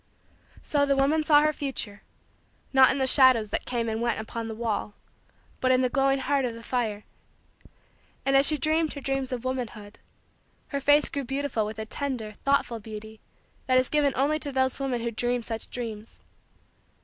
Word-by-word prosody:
So 290 -1 +1
the 280 -1 +2
woman 280 +4 +2
saw 295 -1 +5
her 305 0 +2
future, 260 -8 -3 0.7
not 265 -1 +7
in 265 - 0
the 265 - +1
shadows 255 -5 +5
that - - -3
came 235 -2 -2
and 220 0 -2
went 235 -1 0
upon 225 +1 -5
the 220 - -6
wall, 215 -2 -3 0.6
but 255 - +1
in 255 0 +3
the 255 - +1
glowing 270 -1 +2
heart 275 +1 0
of 240 -2 -3
the 230 - -11
fire. 225 -4 -2 1.2
And, 275 0 +2
as 275 +1 +6
she 305 - +3
dreamed 315 +2 0
her 280 - -8
dreams 270 -1 -2
of 250 -1 -4
womanhood, 225 -5 -5 0.7
her 280 - -2
face 290 +2 +4
grew 280 - -4
beautiful 270 -4 -2
with 215 0 -7
a 220 - -5
tender, 245 -3 -2
thoughtful, 275 -4 +1
beauty 220 0 -10 0.5
that 255 0 +4
is 255 0 +2
given 290 -2 +2
only 295 +4 +1
to 290 -2 +4
those 260 0 0
women 260 -3 -2
who 235 0 -2
dream 240 +2 -1
such 225 -1 -5
dreams. 225 -3 -7
255 Hz, 185 wpm, -26 LUFS, 225-275 Hz, 1.2 s, not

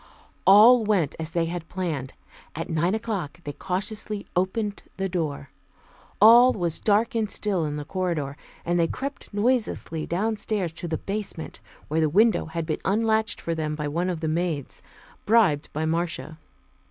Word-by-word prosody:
All 220 +5 +8
went 195 -9 +1
as 160 -1 -4
they 170 0 0
had 170 -1 -5
planned. 160 -8 -4 0.4
At 165 +3 -4
nine 170 +5 +1
o'clock 200 -10 -4
they 145 - -5
cautiously 205 +4 -3
opened 200 +3 -1 0.2
the 195 0 -1
door. 155 -7 -3 0.7
All 240 +4 +8
was 170 -4 -2
dark 220 +4 +2
and 220 -2 0
still 195 -7 0
in 150 0 -3
the 145 - -5
corridor, 165 -5 -2 0.3
and 175 +1 +1
they 165 - +3
crept 275 +7 -6
noiselessly 210 -7 -1
downstairs 205 -1 -1
to 170 +2 -5
the 160 - -2
basement, 200 -5 -4 0.3
where 155 +2 0
the 155 - +2
window 215 +6 +3
had 165 0 -4
been 155 -1 -3
unlatched 220 +2 +1
for 170 - -3
them 155 -2 -2
by 150 -1 -3
one 170 +5 -1
of 170 -3 -3
the 160 - -1
maids, 160 -3 -2 0.5
bribed 205 -10 +3
by 155 +2 -2
Marcia. 160 -2 -2
175 Hz, 165 wpm, -25 LUFS, 160-210 Hz, 0.7 s, All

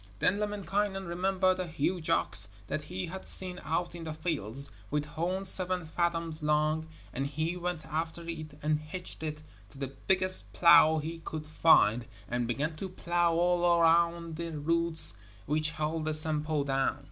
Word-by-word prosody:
Then 195 - +1
Lemminkainen 205 -1 -1
remembered 185 +2 +1
a 185 - -2
huge 165 +1 -2
ox 105 -10 +2 0.2
that 150 +7 -4
he 180 +3 -4
had 190 +3 -7
seen 180 -1 +3
out 165 +3 -1
in 170 -1 -8
the 155 -1 -5
fields, 140 - -1 0.2
with 150 0 -1
horns 175 +6 -2
seven 185 -2 +1
fathoms 165 -1 -2
long, 155 +1 +1 0.3
and 135 +2 -2
he 155 +4 -2
went 175 -2 -4
after 160 +2 -4
it 155 -3 -6
and 150 0 +1
hitched 155 +4 -8
it 155 -1 -5 0.3
to 100 - -17
the 135 -1 -5
biggest 185 0 +1
plough 160 -2 +7
he 160 +2 -4
could 155 -1 -6
find, 125 -7 +4 0.2
and 120 0 -1
began 150 +7 -2
to 190 +3 -5
plough 175 -2 0
all 175 0 +3
around 170 0 +2
the 170 -1 -4
roots 165 0 0 0.3
which 155 +1 0
held 155 +1 -2
the 155 -1 +2
Sampo 155 -1 +2
down. 135 0 0
165 Hz, 165 wpm, -30 LUFS, 150-175 Hz, 0.3 s, plough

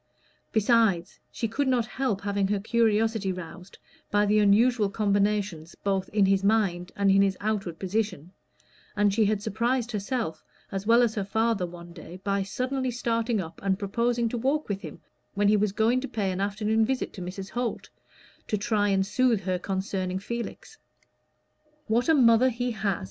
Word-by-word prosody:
Besides, 215 -5 +2
she 230 - -2
could 270 +6 -1
not 250 -3 +2
help 240 -4 -2
having 200 -1 0
her 205 0 0
curiosity 220 -2 +1
roused 180 +1 -9 0.3
by 205 0 +2
the 210 +1 +3
unusual 210 +1 +4
combinations 200 -5 0
both 195 -1 0
in 205 -1 +3
his 195 0 +2
mind 195 -4 +1
and 200 -1 +3
in 195 0 +5
his 195 -1 +1
outward 200 -5 -2
position, 190 -4 -2 0.6
and 205 -2 +2
she 220 +1 +3
had 205 0 0
surprised 240 +3 -1
herself 210 -5 -3 0.3
as 195 +1 -4
well 235 +1 +6
as 230 -2 +1
her 205 - -2
father 220 -1 0
one 170 0 -11
day 170 +1 -10
by 200 0 0
suddenly 255 +6 -2
starting 230 -1 -1
up 165 -3 -7
and 195 -1 0
proposing 235 +4 0
to 240 - -3
walk 275 +4 0
with 200 -1 -2
him 155 -5 -9 0.4
when 205 0 +2
he 210 - +5
was 210 -1 +1
going 230 +5 +2
to 270 - -4
pay 200 -6 -2
an 185 +1 -3
afternoon 210 +2 +1
visit 260 +3 -1
to 190 - -8
Mrs. 190 +2 -6
Holt, 240 0 -3 0.6
to 210 - 0
try 205 0 +1
and 190 -1 +2
soothe 235 0 +2
her 185 -1 -1
concerning 190 -1 -2
Felix. 235 - -6 1.1
"What 235 +6 +1
a 320 - +6
mother 245 -1 +5
he 245 0 -2
has!" 200 -4 -1
210 Hz, 175 wpm, -27 LUFS, 195-230 Hz, 1.1 s, well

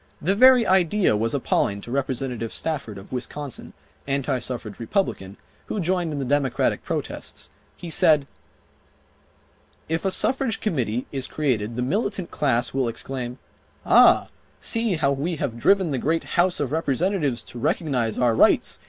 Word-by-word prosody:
The 185 +5 +1
very 250 +2 +6
idea 190 - +3
was 115 +5 0
appalling 100 -6 0
to 120 - -9
Representative 130 -3 -2
Stafford 140 -10 -3
of 95 - -12
Wisconsin, 130 +2 -5 0.3
anti 135 -1 0
suffrage 120 -4 -5
Republican, 110 - -2 0.3
who 215 - -3
joined 175 -2 0
in 150 - -4
the 135 - -2
Democratic 140 -1 0
protests. - - -5 0.3
He 170 - -8
said: 150 -2 +4 1.6
"If 160 +1 -2
a 195 - +1
Suffrage 255 +4 0
Committee 125 - -1
is 135 -2 -2
created 120 -7 -1
the 125 - -1
militant 195 - -2
class 125 -4 0
will 130 -2 0
exclaim, 125 +1 -4 0.5
'Ah, - - +6 0.3
see 230 -4 0
how 150 -3 +1
we 150 +6 -2
have 120 -6 -4
driven 190 - +3
the 135 - -1
great 165 +5 0
House 175 +1 +2
of 140 -3 -2
Representatives 155 - 0
to 120 - -10
recognize 130 -5 -1
our 120 -2 +3
rights. - - +3
140 Hz, 150 wpm, -24 LUFS, 120-175 Hz, 1.6 s, very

